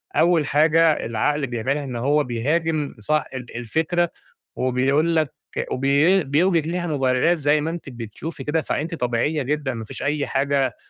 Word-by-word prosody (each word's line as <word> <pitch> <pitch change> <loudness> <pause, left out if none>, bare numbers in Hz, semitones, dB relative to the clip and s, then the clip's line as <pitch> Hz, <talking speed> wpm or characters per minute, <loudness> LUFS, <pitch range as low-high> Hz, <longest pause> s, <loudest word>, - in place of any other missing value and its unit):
أول 170 -3 +3
حاجة 155 +2 +3
العقل 135 +6 0
بيعملها 130 +5 -2
إن 130 -3 -6
هو 145 +5 +2
بيهاجم 150 +5 -1
صاح 155 +8 0
ال 125 -3 -8
الفكرة 160 +8 0 0.5
وبيقول 135 +6 +1
لك 155 -4 +1 0.4
وبي 145 +8 +3
بيُوجد 160 +3 +2
لها 175 +1 -2
مبررات 135 +3 +2
زَي 145 0 +2
ما 160 - -2
أنتِ 165 -3 -6
بتشوفي 125 +5 -7
كده، 155 +3 0
فأنتِ 165 +3 -3
طبيعية 130 +3 0
جدًا 140 -1 -1
ما 110 -1 -6
فيش - - -8
أي 145 0 0
حاجة 135 -2 0
145 Hz, 155 wpm, -22 LUFS, 130-160 Hz, 0.5 s, أول